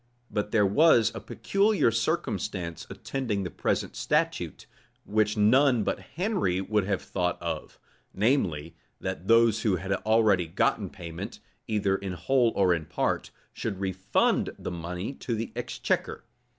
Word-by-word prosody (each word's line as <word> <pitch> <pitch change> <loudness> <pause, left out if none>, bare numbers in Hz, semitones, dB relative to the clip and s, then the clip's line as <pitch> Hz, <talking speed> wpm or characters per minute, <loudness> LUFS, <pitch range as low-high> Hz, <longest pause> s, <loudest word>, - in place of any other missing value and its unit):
[*] 120 - -32
But 105 0 -1
there 105 -2 +3
was 115 +1 +5
a - - -5
peculiar 200 - +1
circumstance 105 - -2
attending 115 -8 -3
the 90 - -4
present - - -1
statute, - - -1 0.4
which 105 0 +1
none 125 +3 +4
but - - -1
Henry 165 - -1
would 105 +1 0
have 100 -1 -1
thought 90 -2 -1
of; - - -5 0.3
namely, 90 - 0 0.2
that 90 - -5
those 115 -1 +5
who 105 -4 +2
had 95 +2 -5
already 105 -5 +3
gotten 80 - 0
payment, 85 -1 -7 0.3
either 100 -3 +1
in 95 -1 -4
whole 125 +5 +2
or 95 -2 +4
in 80 -2 -2
part, - - -1 0.2
should 95 - -4
refund 95 0 +1
the - - -5
money 90 +7 -4
to 120 -3 -3
the 115 +1 -4
exchequer. - - -2
105 Hz, 145 wpm, -27 LUFS, 95-115 Hz, 0.4 s, was